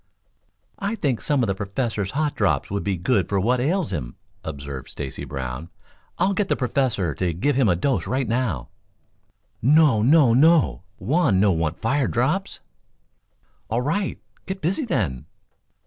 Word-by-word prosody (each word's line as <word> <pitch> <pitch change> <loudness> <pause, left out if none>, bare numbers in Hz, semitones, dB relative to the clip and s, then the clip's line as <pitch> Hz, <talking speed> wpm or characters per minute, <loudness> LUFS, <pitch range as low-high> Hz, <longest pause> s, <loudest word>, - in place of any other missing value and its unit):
"I 200 +3 -2
think 140 - -1
some 145 -4 +1
of - - +1
the 95 - +1
Professor's 100 +1 -3
hot 150 +1 0
drops 100 -3 0
would 100 0 -2
be 100 -2 -1
good 95 +2 +1
for 100 - +1
what 120 +6 +2
ails 160 - 0
him," 60 -7 -4 0.3
observed 70 -3 -7
Stacy 70 0 -6
Brown. 65 +3 -5 0.5
"I'll 185 +3 +2
get 195 0 0
the - - +1
Professor 120 - 0
to 90 +3 -1
give 140 - +1
him 130 -5 +3
a 90 - +3
dose 130 +10 0
right 130 0 -1
now." 110 - -1 0.9
"No, 140 -3 +5
no, 135 0 +5
no! 155 - +4 0.2
Juan 140 - +2
no 100 0 +4
want 80 -2 -1
fire 130 +3 0
drops." 160 +12 -1 1.1
"All 115 +2 0
right; 190 +8 -1 0.3
get 190 +1 -4
busy, 190 - -1
then." 75 - -2
120 Hz, 160 wpm, -23 LUFS, 90-145 Hz, 1.1 s, No